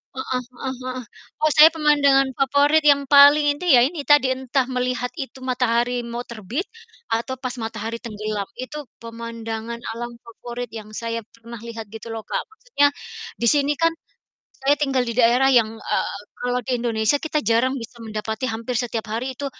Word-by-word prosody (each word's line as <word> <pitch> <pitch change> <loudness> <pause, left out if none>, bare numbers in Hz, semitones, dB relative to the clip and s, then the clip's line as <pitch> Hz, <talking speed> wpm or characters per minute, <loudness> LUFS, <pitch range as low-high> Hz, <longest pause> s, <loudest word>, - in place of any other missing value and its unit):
heeh 260 -1 -2 0.2
heeh 265 -1 -2
heeh. 255 0 -4 0.4
Oh 310 -1 +3
saya 310 +2 +10
pemandangan 285 -3 +4
favorit 285 +3 +3
yang 285 -1 +5
paling 285 +1 +8
inti 350 -3 +2
ya 245 - +8
ini 285 +3 0
tadi 290 -3 +5
entah 260 0 -1
melihat 250 -1 -1
itu 270 -3 -6
matahari 245 -1 0
mau 235 +1 -4
terbit, 235 - -4 0.4
atau 230 +3 -1
pas 255 -2 -3
matahari 225 0 -4
tenggelam. 215 -3 -4
Itu 285 +4 -7 0.2
pemandangan 230 0 -6 0.2
alam 240 0 -5
favorit 240 +1 -7
yang 215 -2 -8
saya 230 0 -3
pernah 230 +1 -10
lihat 230 -1 -7
gitu 225 +2 -9
loh, 225 - -4
Kak. - - -2
Maksudnya 435 -9 +1 0.5
di 235 - +2
sini 290 0 +2
kan 330 0 +4 0.7
saya 275 +2 +3
tinggal 270 -4 0
di 235 - -3
daerah 245 +2 +4
yang, 225 -3 +4
eee, - - -2 0.2
kalau 245 0 -1
di 255 - 0
Indonesia 220 0 +1
kita 315 -1 -1
jarang 235 +3 +3
bisa 235 0 -10
mendapati 220 +2 -3
hampir 230 +3 -4
setiap 230 -1 -2
hari 240 +4 -4
itu, 285 - -3
245 Hz, 170 wpm, -22 LUFS, 230-275 Hz, 0.7 s, saya